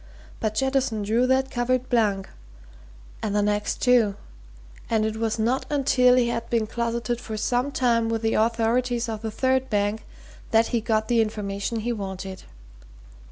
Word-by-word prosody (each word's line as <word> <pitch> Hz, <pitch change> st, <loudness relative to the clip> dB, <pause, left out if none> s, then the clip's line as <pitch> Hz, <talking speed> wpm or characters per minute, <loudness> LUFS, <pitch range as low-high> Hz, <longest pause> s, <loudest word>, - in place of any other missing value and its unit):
But 215 Hz, -1 st, -2 dB
Jettison 265 Hz, -4 st, 0 dB
drew 230 Hz, +5 st, +2 dB
that 265 Hz, +1 st, +1 dB
covert 250 Hz, +1 st, 0 dB
blank, 210 Hz, -6 st, +1 dB, 0.9 s
and 210 Hz, -1 st, -2 dB
the 205 Hz, -, +2 dB
next, 210 Hz, 0 st, -1 dB
too, 240 Hz, -5 st, +4 dB, 0.7 s
and 220 Hz, -1 st, +2 dB
it 220 Hz, 0 st, -2 dB
was 225 Hz, 0 st, -1 dB
not 235 Hz, +4 st, 0 dB
until 260 Hz, -3 st, +4 dB
he 245 Hz, -2 st, +3 dB
had 230 Hz, -1 st, -3 dB
been 230 Hz, -2 st, +1 dB
closeted 235 Hz, +1 st, -2 dB
for 220 Hz, -3 st, -5 dB
some 245 Hz, +5 st, 0 dB
time 235 Hz, -4 st, +1 dB
with 225 Hz, 0 st, -2 dB
the 225 Hz, -, +1 dB
authorities 235 Hz, +2 st, +1 dB
of 220 Hz, -2 st, -4 dB
the 225 Hz, -, -3 dB
third 260 Hz, +3 st, 0 dB
bank 205 Hz, +1 st, 0 dB, 0.5 s
that 225 Hz, 0 st, +3 dB
he 235 Hz, -2 st, 0 dB
got 220 Hz, 0 st, 0 dB
the 235 Hz, -1 st, +3 dB
information 210 Hz, 0 st, -3 dB
he 240 Hz, +2 st, -1 dB
wanted. 190 Hz, -2 st, -6 dB
230 Hz, 160 wpm, -24 LUFS, 215-245 Hz, 0.9 s, too